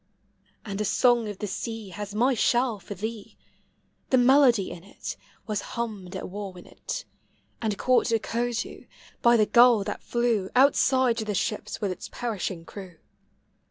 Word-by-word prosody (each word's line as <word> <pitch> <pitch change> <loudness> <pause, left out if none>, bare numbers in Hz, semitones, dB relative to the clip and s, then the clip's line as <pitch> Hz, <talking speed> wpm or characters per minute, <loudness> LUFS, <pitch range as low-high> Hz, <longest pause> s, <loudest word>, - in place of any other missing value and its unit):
And 200 -1 -4
a - - +1
song 240 +2 +3
of 205 - -6
the 210 - -4
s«;i 215 +1 -5
Has 205 +1 -6
mv 250 +4 +3
shell 240 -1 +2
for 200 +2 -8
thee: 215 +2 -6 0.7
The 260 - +4
melody 250 -5 +5
in 170 - -9
it 200 - -7 0.3
Was 215 -2 -2 0.2
hummed 210 -6 -4
at - - -4
Wauwinet, 190 -2 -7 0.6
And 215 -3 -1
caught 255 -1 +2
at 225 -1 +1
Coatue 240 0 -3 0.3
By 235 0 +6
the 215 - +4
gull 235 -2 +6
that 205 +1 -5
Hew 235 -5 0
Outside 260 -2 +4
to 220 - -2
the 210 -1 -2
ships 210 - -2
with 200 -3 0
its 185 - -7
perishing 195 -7 -4
crew. 185 -2 -10
220 Hz, 160 wpm, -26 LUFS, 200-240 Hz, 0.7 s, By